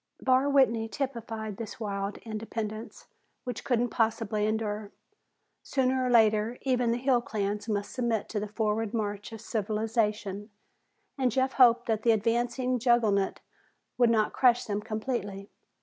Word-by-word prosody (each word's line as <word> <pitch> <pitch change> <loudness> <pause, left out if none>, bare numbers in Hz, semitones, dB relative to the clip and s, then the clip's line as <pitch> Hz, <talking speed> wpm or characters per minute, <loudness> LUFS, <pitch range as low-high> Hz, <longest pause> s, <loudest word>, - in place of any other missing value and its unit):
Barr 260 +2 +3
Whitney 235 -5 +3
typified 225 -6 -4
this 225 0 -7
wild 200 -2 -3
independence, 220 0 -5 0.4
which 245 -4 -5
couldn't 245 -1 +1
possibly 220 -2 0
endure. 215 -1 -2 0.7
Sooner 260 -1 0
or 250 - 0
later 220 0 +3
even 250 -3 +1
the 235 - +1
hill 250 -1 +2
clans 210 -1 -3
must 205 -1 -2
submit 235 -4 -1
to 215 - -2
the 210 - -4
forward 215 +1 -1
march 205 -1 -3
of 225 -1 -8
civilization 215 -2 -1 0.7
and 255 -2 +2
Jeff 260 +3 +1
hoped 240 -2 +5
that 220 -2 0
the 230 0 +4
advancing 240 +3 0
juggernaut 220 -5 +2 0.6
would 240 -1 +5
not 220 -2 +2
crush 245 -2 +4
them 205 -1 -2
completely. 215 -3 -4
225 Hz, 140 wpm, -28 LUFS, 210-245 Hz, 0.7 s, hoped